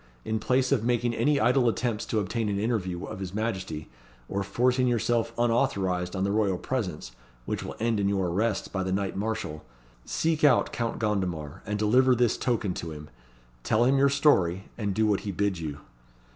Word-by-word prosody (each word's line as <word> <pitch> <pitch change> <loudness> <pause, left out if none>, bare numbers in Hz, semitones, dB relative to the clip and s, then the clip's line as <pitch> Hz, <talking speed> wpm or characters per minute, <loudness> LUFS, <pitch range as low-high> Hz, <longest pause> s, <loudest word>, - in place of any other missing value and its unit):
In 110 0 -1
place 130 +3 +1
of 130 -6 +2
making 120 0 +1
any 145 +4 +2
idle 120 +2 +4
attempts 115 -1 -2
to 110 - 0
obtain 105 +2 -1
an 100 - -1
interview 100 -5 -1
of - - -7
his 95 0 -5
Majesty, 95 -9 -3 0.4
or 100 - -2
forcing 125 +5 +1
yourself 120 -1 +1
unauthorised 100 -7 +1
on 95 - -1
the 100 - +1
royal 100 -3 +1
presence, 90 - -3 0.3
which - - -3
will - - -6
end 115 -1 +1
in 100 0 +1
your 95 -3 0
arrest 100 +4 -1
by 95 - -1
the 95 0 -2
Knight 95 0 -1
Marshall, 100 -7 -3 0.4
seek 160 - -1
out 140 -5 +4
Count 115 -1 -2
Gondomar, 90 -9 -2
and 105 +1 -1
deliver 125 +5 +4
this 120 -1 +2
token 115 -6 -1
to 85 - -5
him. 75 -1 -9 0.5
Tell 110 - +2
him 135 +2 +3
your 140 +1 +5
story; 95 - +2
and 100 -4 -2
do 110 - +2
what 105 -2 +2
he 100 - -4
bids 95 -2 -1
you." 75 -2 -5
105 Hz, 190 wpm, -27 LUFS, 95-120 Hz, 0.5 s, your